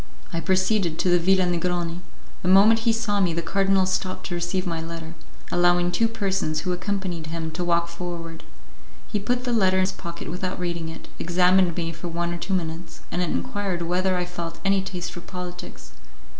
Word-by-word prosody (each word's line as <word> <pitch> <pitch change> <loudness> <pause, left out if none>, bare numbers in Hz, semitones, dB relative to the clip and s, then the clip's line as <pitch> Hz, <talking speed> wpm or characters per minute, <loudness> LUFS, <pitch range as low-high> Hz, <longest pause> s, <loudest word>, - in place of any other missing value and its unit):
I 165 - 0
proceeded 185 0 +2
to 180 - +1
the 175 0 +5
Villa 185 +2 +4
Negroni; 175 -1 -1 0.4
the - - -3
moment 220 +5 +6
he - - +7
saw 225 -3 0
me 175 -4 +2
the 170 - -1
cardinal 195 +1 +3
stopped 185 0 -2
to 175 - -3
receive 175 +2 -1
my 165 -2 -2
letter, 165 0 -6 0.4
allowing 175 0 +4
two 225 +6 +3
persons 195 -8 -1
who 180 0 -1
accompanied 180 -3 -3
him 160 0 -3
to 175 +3 -3
walk 170 -1 +2
forward. 170 -1 -6 0.7
He 210 - +1
put 245 +5 0
the 245 -1 0
letter 190 -4 +4
in - - +4
his 185 +1 +2
pocket 170 -3 -7
without 180 +1 -3
reading 170 -2 -2
it, 160 - -9
examined 180 0 +3
me 165 -1 -1
for 170 +2 -7
one 170 0 -1
or - - -3
two 190 +2 -1
minutes, 165 -1 -4
and 180 - 0
enquired 190 -1 -1
whether 185 +2 +1
I 180 - 0
felt 170 -2 -6
any 195 0 +4
taste 180 -3 -4
for 175 - -8
politics. 180 - -8
180 Hz, 195 wpm, -25 LUFS, 170-190 Hz, 0.7 s, he